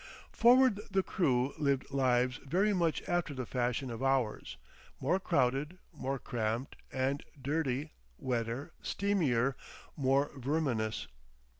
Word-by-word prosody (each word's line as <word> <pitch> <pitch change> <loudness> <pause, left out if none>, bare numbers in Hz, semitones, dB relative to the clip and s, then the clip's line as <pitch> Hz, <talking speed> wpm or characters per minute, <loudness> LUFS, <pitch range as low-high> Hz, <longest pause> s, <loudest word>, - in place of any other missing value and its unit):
Forward 245 -2 +5
the 195 -1 +2
crew 135 -8 +1
lived 140 -3 0
lives 130 -1 +2
very 190 +10 +1
much 170 -4 +1
after 175 -4 0
the 130 -1 -3
fashion 125 +1 -1
of 115 +1 -6
ours, 135 -5 0 0.4
more 185 - +1
crowded, 150 -1 +1 0.2
more 135 -2 -3
cramped 115 +1 -2 0.2
and 135 +2 -1 0.2
dirty, 140 0 -1 0.3
wetter, 120 +1 -2
steamier, 145 -11 +1 0.4
more 140 +1 +2
verminous. 130 -5 -1
135 Hz, 115 wpm, -32 LUFS, 125-160 Hz, 0.4 s, Forward